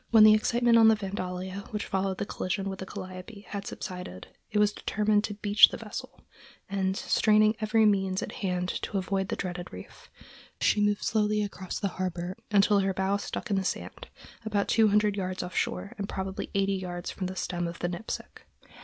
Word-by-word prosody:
When 220 Hz, -2 st, +7 dB
the 215 Hz, 0 st, +9 dB
excitement 235 Hz, +2 st, +4 dB
on 225 Hz, -, +8 dB
the 220 Hz, -, +6 dB
Vandalia 190 Hz, -1 st, -5 dB
which 210 Hz, -1 st, -3 dB
followed 190 Hz, -1 st, -1 dB
the -, -, -2 dB
collision 195 Hz, 0 st, -2 dB
with 190 Hz, -, -7 dB
the 190 Hz, -, -6 dB
Calliope 185 Hz, +2 st, -8 dB
had 200 Hz, -1 st, -5 dB
subsided, 180 Hz, -, -7 dB, 0.2 s
it 215 Hz, -, -2 dB
was 210 Hz, 0 st, +4 dB
determined 210 Hz, 0 st, +1 dB
to 205 Hz, -, -5 dB
beach 205 Hz, 0 st, +6 dB
the -, -, -6 dB
vessel, -, -, -8 dB, 0.5 s
and 190 Hz, -1 st, -1 dB
straining 215 Hz, 0 st, +4 dB
every 220 Hz, 0 st, +3 dB
means 195 Hz, -2 st, +2 dB
at -, -, -5 dB
hand 180 Hz, -2 st, -2 dB
to 205 Hz, -, -3 dB
avoid 190 Hz, 0 st, -1 dB
the -, -, -2 dB
dreaded 180 Hz, -1 st, -5 dB
reef, -, -, -11 dB, 0.5 s
she 210 Hz, -, +3 dB
moved 205 Hz, 0 st, +1 dB
slowly 210 Hz, -1 st, +1 dB
across 190 Hz, -2 st, -5 dB
the 200 Hz, -, 0 dB
harbor 180 Hz, 0 st, -2 dB
until 205 Hz, 0 st, +4 dB
her 195 Hz, -1 st, 0 dB
bow 190 Hz, +1 st, +1 dB
stuck 205 Hz, -, -5 dB
in 200 Hz, -, +2 dB
the 190 Hz, -, 0 dB
sand, -, -, -4 dB, 0.4 s
about 205 Hz, -2 st, 0 dB
two 225 Hz, -1 st, +4 dB
hundred 210 Hz, 0 st, +3 dB
yards 185 Hz, -1 st, -2 dB
off 180 Hz, -, -7 dB
shore 200 Hz, -, -1 dB
and 200 Hz, -, -3 dB
probably 190 Hz, 0 st, -4 dB
eighty 195 Hz, 0 st, +2 dB
yards 180 Hz, -2 st, -4 dB
from 185 Hz, -, -4 dB
the 185 Hz, -, -6 dB
stem 175 Hz, -2 st, -2 dB
of 170 Hz, -, -6 dB
the 175 Hz, -, -2 dB
Nipsic. 175 Hz, +5 st, -6 dB
195 Hz, 200 wpm, -28 LUFS, 185-210 Hz, 0.5 s, the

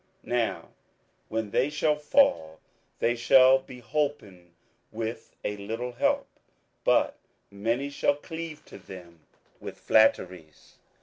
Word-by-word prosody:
27:011:034 120 Hz, -, -2 dB
Now 110 Hz, -8 st, -3 dB, 0.6 s
when 110 Hz, -2 st, -3 dB
they 130 Hz, +7 st, +2 dB
shall 150 Hz, 0 st, +1 dB
fall, 85 Hz, -, +2 dB, 0.4 s
they 120 Hz, +1 st, +1 dB
shall 130 Hz, +2 st, +6 dB
be 130 Hz, -2 st, -13 dB
holpen 115 Hz, -11 st, -3 dB, 0.4 s
with 115 Hz, +1 st, -6 dB
a 105 Hz, -, -3 dB
little 115 Hz, +5 st, -5 dB
help: 120 Hz, -, 0 dB, 0.6 s
but -, -, +2 dB, 0.3 s
many 115 Hz, +8 st, -2 dB
shall 140 Hz, -, +1 dB
cleave 160 Hz, +1 st, -8 dB
to -, -, -12 dB
them 85 Hz, -3 st, -12 dB, 0.4 s
with -, -, -8 dB
flatteries. 90 Hz, -7 st, +1 dB
115 Hz, 120 wpm, -27 LUFS, 100-140 Hz, 0.6 s, shall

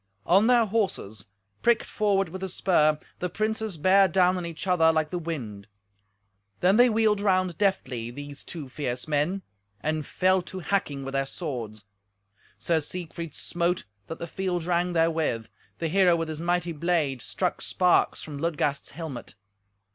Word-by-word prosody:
On 195 Hz, +6 st, +5 dB
their 240 Hz, -2 st, +5 dB
horses, 190 Hz, -, -2 dB, 0.3 s
pricked 235 Hz, -1 st, +3 dB
forward 195 Hz, -3 st, +1 dB
with 190 Hz, +3 st, -7 dB
the 190 Hz, -, -3 dB
spur, 155 Hz, -5 st, +3 dB, 0.2 s
the 180 Hz, -, -2 dB
princes 215 Hz, 0 st, -2 dB
bare 190 Hz, +4 st, +5 dB
down 185 Hz, +1 st, +3 dB
on 180 Hz, -2 st, -3 dB
each 165 Hz, 0 st, -6 dB
other 170 Hz, -3 st, +4 dB
like 155 Hz, -1 st, 0 dB
the 180 Hz, -, -2 dB
wind. 115 Hz, -12 st, -5 dB, 0.9 s
Then 190 Hz, +3 st, +4 dB
they 245 Hz, +1 st, +7 dB
wheeled 215 Hz, -2 st, +2 dB
round 185 Hz, -3 st, +2 dB
deftly—these 140 Hz, -, -2 dB
two 155 Hz, -5 st, -7 dB
fierce 125 Hz, -1 st, -4 dB
men—and 150 Hz, -, -2 dB
fell 185 Hz, +4 st, +2 dB
to 185 Hz, +1 st, -9 dB
hacking 145 Hz, -6 st, -1 dB
with 135 Hz, -, -5 dB
their 135 Hz, 0 st, 0 dB
swords. 115 Hz, -, -5 dB, 0.7 s
Sir 165 Hz, -2 st, +1 dB
Siegfried 165 Hz, 0 st, -6 dB
smote, 175 Hz, +1 st, -1 dB, 0.2 s
that 165 Hz, -, -6 dB
the -, -, -5 dB
field 180 Hz, 0 st, -2 dB
rang 175 Hz, +1 st, 0 dB
therewith; 160 Hz, -9 st, +1 dB, 0.3 s
the 165 Hz, -, -1 dB
hero 180 Hz, +1 st, +4 dB
with 165 Hz, -1 st, -2 dB
his 155 Hz, 0 st, -5 dB
mighty 175 Hz, 0 st, 0 dB
blade 155 Hz, -5 st, 0 dB
struck -, -, -2 dB
sparks 180 Hz, -1 st, +2 dB
from 145 Hz, -2 st, -7 dB
Ludgast's 145 Hz, -3 st, -1 dB
helmet. 150 Hz, -6 st, -7 dB
170 Hz, 155 wpm, -26 LUFS, 145-185 Hz, 0.9 s, they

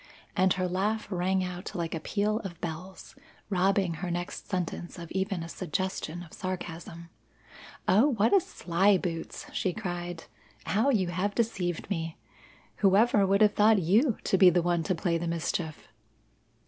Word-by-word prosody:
and 185 Hz, -1 st, +4 dB
her 185 Hz, -1 st, -1 dB
laugh 205 Hz, +4 st, -1 dB
rang 185 Hz, +1 st, +1 dB
out 180 Hz, 0 st, -6 dB
like 170 Hz, -2 st, -2 dB
a 165 Hz, -, -2 dB
peal 210 Hz, +6 st, 0 dB
of 180 Hz, -6 st, -8 dB
bells, 175 Hz, +3 st, -7 dB, 0.4 s
robbing 190 Hz, -1 st, +2 dB
her 175 Hz, +3 st, -4 dB
next 175 Hz, +1 st, -4 dB
sentence 175 Hz, -2 st, -3 dB
of 170 Hz, -2 st, -9 dB
even 190 Hz, -2 st, -1 dB
a -, -, -6 dB
suggestion 175 Hz, -1 st, -3 dB
of 165 Hz, -, -15 dB
sarcasm. 170 Hz, -2 st, -6 dB, 0.8 s
"Oh, 215 Hz, +9 st, +5 dB
what 225 Hz, -5 st, +2 dB
a 395 Hz, -, +6 dB
sly 190 Hz, -, +2 dB
boots!" 165 Hz, -3 st, -5 dB
she 185 Hz, -, 0 dB
cried. 175 Hz, -4 st, -5 dB, 0.4 s
"How 215 Hz, +11 st, +2 dB
you 195 Hz, -9 st, +2 dB
have 185 Hz, +4 st, -1 dB
deceived 185 Hz, -7 st, -1 dB
me! 165 Hz, -3 st, -3 dB, 0.6 s
Whoever 200 Hz, +1 st, +4 dB
would 200 Hz, +2 st, +3 dB
have 210 Hz, -1 st, +6 dB
thought 215 Hz, +1 st, +5 dB
you 210 Hz, -, +3 dB
to 190 Hz, -, +1 dB
be 185 Hz, -, +9 dB
the 175 Hz, 0 st, +2 dB
one 175 Hz, -1 st, +1 dB
to 185 Hz, -, +1 dB
play 170 Hz, 0 st, 0 dB
the 170 Hz, -, -3 dB
mischief!" 165 Hz, -1 st, -3 dB
185 Hz, 160 wpm, -29 LUFS, 170-200 Hz, 0.8 s, be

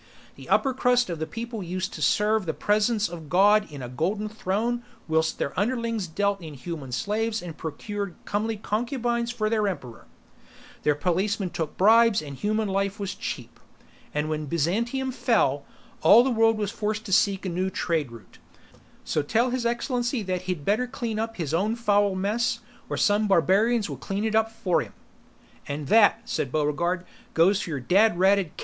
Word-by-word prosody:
The -, -, -13 dB
upper 270 Hz, -2 st, +3 dB
crust 245 Hz, -5 st, +2 dB
of 160 Hz, -1 st, -4 dB
people 230 Hz, +2 st, -5 dB
used 185 Hz, +1 st, -4 dB
to 155 Hz, -, -7 dB
serve 210 Hz, +6 st, +2 dB
the 160 Hz, -, -1 dB
Presence 210 Hz, +1 st, +1 dB
of 165 Hz, -3 st, -9 dB
God 205 Hz, +2 st, +4 dB
in 140 Hz, -3 st, -7 dB
a -, -, -5 dB
golden 190 Hz, -, -2 dB
throne 220 Hz, +3 st, -1 dB, 0.3 s
whilst 160 Hz, 0 st, +1 dB
their 140 Hz, -, -2 dB
underlings 230 Hz, -2 st, -1 dB
dealt 200 Hz, +4 st, -1 dB
in 155 Hz, -3 st, -8 dB
human 140 Hz, -1 st, -7 dB
slaves 215 Hz, -, -1 dB
and 175 Hz, -4 st, -8 dB
procured 200 Hz, +5 st, -5 dB
comely 215 Hz, +2 st, -1 dB
concubines 235 Hz, +2 st, -1 dB
for 230 Hz, -3 st, -1 dB
the 225 Hz, +1 st, +1 dB
emperor; 185 Hz, -, -3 dB, 0.7 s
their 150 Hz, -, +2 dB
policemen 185 Hz, +4 st, 0 dB
took 160 Hz, -4 st, -4 dB
bribes 225 Hz, +2 st, +5 dB
and 145 Hz, -2 st, -7 dB
human 215 Hz, +7 st, -1 dB
life 195 Hz, +1 st, -1 dB
was 200 Hz, -1 st, -3 dB
cheap. 125 Hz, -, -6 dB, 0.5 s
And 150 Hz, +1 st, -1 dB
when 155 Hz, -1 st, -3 dB
Byzantium 230 Hz, -, 0 dB
fell, 145 Hz, -, +1 dB, 0.4 s
all 210 Hz, +9 st, +8 dB
the 265 Hz, -, 0 dB
world 225 Hz, -1 st, +3 dB
was 210 Hz, -2 st, -2 dB
forced 215 Hz, 0 st, -3 dB
to 195 Hz, -, -3 dB
seek 195 Hz, 0 st, +2 dB
a -, -, -1 dB
new 185 Hz, +2 st, -1 dB
trade 165 Hz, -6 st, -1 dB
route. 115 Hz, -4 st, -14 dB, 0.6 s
So 155 Hz, -, 0 dB
tell 230 Hz, -, +1 dB
His 250 Hz, -2 st, 0 dB
Excellency 240 Hz, 0 st, -1 dB
that 185 Hz, -2 st, -2 dB
he'd 165 Hz, -6 st, -3 dB
better 220 Hz, +5 st, +1 dB
clean 235 Hz, -4 st, -4 dB
up 225 Hz, 0 st, -3 dB
his 160 Hz, -6 st, -3 dB
own 205 Hz, +7 st, +1 dB
foul 205 Hz, -4 st, +2 dB
mess, 230 Hz, +5 st, 0 dB, 0.3 s
or -, -, -2 dB
some 210 Hz, 0 st, +2 dB
barbarians 200 Hz, +5 st, +3 dB
will -, -, -6 dB
clean 200 Hz, +2 st, -3 dB
it 220 Hz, -, -1 dB
up 220 Hz, 0 st, +2 dB
for 225 Hz, -6 st, 0 dB
him." -, -, -9 dB, 0.7 s
"And 145 Hz, +1 st, -4 dB
that," 225 Hz, +1 st, +5 dB
said 130 Hz, -, -2 dB
Buregarde, 165 Hz, +5 st, 0 dB, 0.3 s
"goes 190 Hz, +5 st, +4 dB
for -, -, -5 dB
your 145 Hz, -4 st, -2 dB
dad 190 Hz, -, +3 dB
ratted 190 Hz, -2 st, +2 dB
cat!" -, -, -7 dB
205 Hz, 180 wpm, -26 LUFS, 170-225 Hz, 0.7 s, all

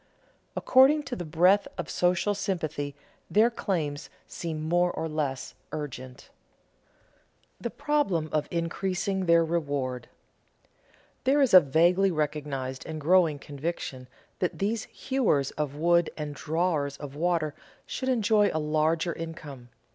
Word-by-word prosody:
According 275 Hz, +4 st, +5 dB
to 265 Hz, -3 st, -5 dB
the 175 Hz, -, -5 dB
breadth 180 Hz, -, +4 dB
of -, -, -4 dB
social 180 Hz, +3 st, +1 dB
sympathy 155 Hz, -8 st, -3 dB, 0.3 s
their 225 Hz, +3 st, +4 dB
claims 155 Hz, -10 st, -3 dB, 0.2 s
seem 155 Hz, -2 st, -5 dB
more 175 Hz, +1 st, +2 dB
or 160 Hz, -, -3 dB
less 150 Hz, -4 st, -3 dB, 0.2 s
urgent. 130 Hz, -3 st, -6 dB
[Sidenote: -, -, -31 dB
The -, -, -2 dB
problem 195 Hz, -, 0 dB
of 155 Hz, -1 st, 0 dB
increasing 185 Hz, +2 st, -2 dB
their 170 Hz, 0 st, +5 dB
reward] 140 Hz, -7 st, -2 dB, 1.1 s
There 270 Hz, +3 st, +3 dB
is 270 Hz, -7 st, +3 dB
a 185 Hz, -, +12 dB
vaguely 175 Hz, +6 st, +3 dB
recognized 145 Hz, -5 st, -3 dB
and 155 Hz, -1 st, -5 dB
growing 165 Hz, -1 st, +3 dB
conviction 140 Hz, -3 st, -5 dB, 0.3 s
that 180 Hz, -, -1 dB
these 215 Hz, +3 st, -1 dB
hewers 225 Hz, -, 0 dB
of 150 Hz, -2 st, -3 dB
wood 170 Hz, +2 st, +3 dB
and 150 Hz, -1 st, -4 dB
drawers 155 Hz, -1 st, -1 dB
of 140 Hz, -1 st, -8 dB
water 165 Hz, -2 st, 0 dB, 0.3 s
should 260 Hz, -, -3 dB
enjoy 215 Hz, -4 st, +3 dB
a -, -, -2 dB
larger 155 Hz, +2 st, +1 dB
income. 150 Hz, -6 st, -8 dB
165 Hz, 130 wpm, -27 LUFS, 150-185 Hz, 1.1 s, a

